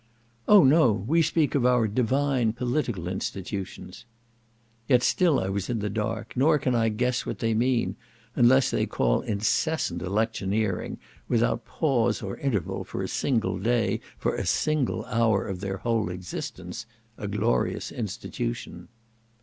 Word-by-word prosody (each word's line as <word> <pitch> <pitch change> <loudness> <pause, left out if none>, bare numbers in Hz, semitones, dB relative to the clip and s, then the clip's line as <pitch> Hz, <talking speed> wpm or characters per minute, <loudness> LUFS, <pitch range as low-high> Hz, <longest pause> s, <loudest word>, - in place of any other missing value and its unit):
"Oh 205 -4 +8
no! 140 -2 +5
we 115 - +1
speak 160 -1 +1
of 140 - +2
our 125 -2 +3
divine 125 +1 +1
political 120 - -2
institutions." 95 +2 -5 0.8
Yet 125 -2 +4
still 170 -3 +3
I 95 - -2
was 95 -1 -3
in 120 - 0
the 105 -1 -2
dark, 110 +2 -3
nor 150 +5 +4
can 130 -3 0
I 115 -1 +2
guess 120 +3 0
what - - -4
they 115 -1 0
mean, 115 -4 +1 0.4
unless 130 +2 +5
they - - 0
call - - +1
incessant 110 - 0
electioneering, 100 0 -1 0.3
without - - +1
pause 120 -7 0
or - - -5
interval 115 - -2
for - - -5
a - - -2
single 115 -8 0
day, 120 +4 +1 0.2
for - - -1
a - - -3
single 155 -4 0
hour, 110 -3 +1
of 95 -2 -4
their 95 0 -3
whole 115 -2 0
existence, 90 +2 -6 0.3
"a 105 - -4
glorious 105 +4 0
institution." 115 -4 -5
115 Hz, 145 wpm, -26 LUFS, 100-130 Hz, 0.8 s, Oh